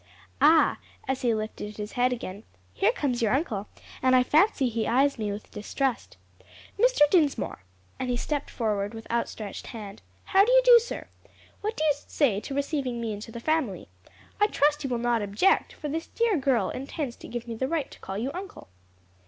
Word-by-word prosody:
Ah," 320 0 +5 0.3
as 265 0 -1
he 245 - +2
lifted 215 -1 -5
his 210 0 -5
head 250 0 +2
again, 210 -5 -5 0.3
"here 395 +4 +3
comes 270 - -1
your 225 +2 +3
uncle, 220 - -2 0.3
and 255 0 +4
I 255 - +6
fancy 305 0 +3
he 230 -2 -1
eyes 270 +2 +2
me 210 -2 -1
with 205 +1 -8
distrust. 255 +4 -3 0.6
Mr. - - +3
Dinsmore," 310 - +2 0.4
and 255 - -2
he 245 - 0
stepped 290 +3 -2
forward 210 -2 -2
with 225 - -8
outstretched 225 -3 -3
hand, 210 -3 -8 0.2
"how 390 0 +5
do 470 - +2
you - - +6
do, 485 -1 +9
sir? 470 - -6 0.5
What 430 +2 -3
do - - 0
you 305 -2 +4
say 240 -10 +2
to 270 +6 -6
receiving 280 -4 -1
me 225 -2 -2
into 210 +2 -8
the 235 - -7
family? 250 - -1 0.5
I 415 - +5
trust 295 -5 +2
you 270 - -2
will 245 - 0
not 235 -1 +1
object, 205 - +2
for 300 - -6
this 320 +3 -3
dear 465 -3 +1
girl 270 -5 +1
intends 270 -1 -4
to - - -11
give 240 0 -6
me 230 - -4
the 260 +4 -2
right 310 -2 -2
to - - -13
call 190 +1 -6
you 245 +6 -2
uncle." 380 - -8
255 Hz, 195 wpm, -27 LUFS, 225-310 Hz, 0.6 s, do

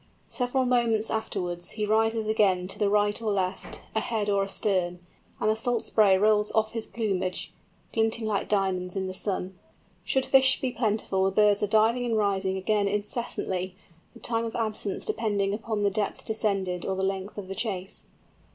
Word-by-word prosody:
Several 255 0 0
moments 235 -3 +2
afterwards 175 -5 -3
he 210 - 0
rises 225 +1 +2
again 195 -4 +2
to - - -3
the 205 -2 +2
right 205 +1 +2
or 220 -2 0
left, 190 -1 -2
ahead 220 -2 -1
or 200 0 +2
astern, 190 -3 -1 0.4
and - - 0
the 215 - +3
salt 235 +1 -1
spray 200 -3 +4
rolls 210 +1 +3
off 220 0 +2
his 225 -1 -3
plumage 190 -5 -2 0.4
glinting 225 0 +1
like 210 -2 -1
diamonds 190 -3 0
in 190 -1 -1
the 185 - -4
sun. 185 -1 -3 0.4
Should 265 +7 +1
fish 265 -1 +5
be 260 - -1
plentiful 215 -5 0
the - - +3
birds 205 +1 +3
are 210 - +1
diving 220 +4 +3
and 230 -2 0
rising 195 -2 +1
again 205 +1 +1
incessantly, 200 -3 -3 0.4
the - - -12
time 230 -1 -1
of 225 - -5
absence 215 -3 -2
depending 205 - 0
upon 215 -1 -2
the 200 - +3
depth 205 +1 -2
descended 195 -5 0
or 190 - -1
the 190 0 0
length 195 +1 -3
of 200 -2 -6
the 195 - -4
chase. 195 -3 -4
210 Hz, 180 wpm, -27 LUFS, 190-220 Hz, 0.4 s, fish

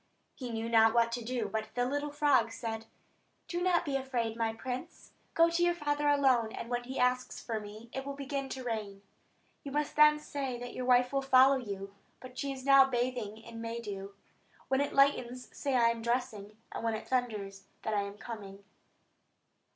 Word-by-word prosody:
He 250 -2 -7
knew 225 0 -3
not 225 0 +5
what 230 0 +4
to 235 0 -3
do; 240 -2 -2
but 220 +2 -3
the 245 0 +1
little 290 +3 -2
frog 285 -6 +3
said: 225 -1 -5 0.6
"Do 345 0 -3
not 355 -1 +2
be 280 -3 -2
afraid, 250 -4 -1
my 225 -1 0
prince. 255 +7 -7 0.2
Go 335 0 +6
to 335 +1 0
your 345 0 +3
father 295 -2 0
alone; 260 -6 +3
and 235 - -6
when 245 0 -1
he 260 +2 -6
asks 250 0 +1
for 225 -2 -3
me, 210 +2 -10
it 265 - -3
will 280 0 -5
begin 275 -1 -4
to 260 -1 -5
rain. 210 -4 -4 0.6
You 280 - -6
must 295 +1 -1
then 300 0 +7
say 275 -4 -4
that 245 0 -7
your 255 - -4
wife 250 +1 +4
will 275 - +2
follow 270 0 +6
you; 200 -5 -6 0.3
but 255 -1 -11
she 275 +1 -3
is 265 -1 -7
now 275 -1 +8
bathing 245 -4 -2
in 230 0 -10
May 230 +1 -4
dew. 200 -3 -7 0.5
When 265 +1 +2
it 285 - -1
lightens 255 -3 +2
say 280 -2 -2
that 245 -2 +4
I 230 - +6
am 230 -1 -5
dressing; 225 -3 -2
and - - -5
when 225 -1 0
it 220 - -7
thunders, 210 -6 -2 0.2
that 220 - -1
I 205 - +2
am 200 0 -6
coming." 200 -4 -8
245 Hz, 205 wpm, -31 LUFS, 225-275 Hz, 0.6 s, now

